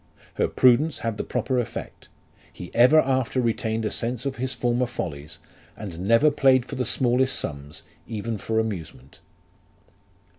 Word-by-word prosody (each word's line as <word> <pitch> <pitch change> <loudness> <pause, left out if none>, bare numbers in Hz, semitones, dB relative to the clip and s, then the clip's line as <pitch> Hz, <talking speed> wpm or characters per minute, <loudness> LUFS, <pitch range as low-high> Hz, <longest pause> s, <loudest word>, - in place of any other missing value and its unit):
Her - - +1
prudence 130 +5 +3
had 115 -2 -2
the - - -2
proper 130 -2 -1
effect; 120 - -6 0.4
he 90 - -10
ever 125 +6 +6
after 130 -2 0
retained 115 -2 -1
a - - -1
sense 120 +1 -3
of 140 -1 -3
his 130 +1 -3
former 120 +1 0
follies, 75 -10 -6 0.4
and 95 -6 -7
never 115 +7 +5
played 135 -3 +3
for - - -10
the 130 -2 -2
smallest 130 +3 +1
sums, 70 0 -6 0.2
even 110 0 -4
for 110 +2 -2
amusement. 85 - -5
120 Hz, 150 wpm, -24 LUFS, 110-130 Hz, 0.4 s, ever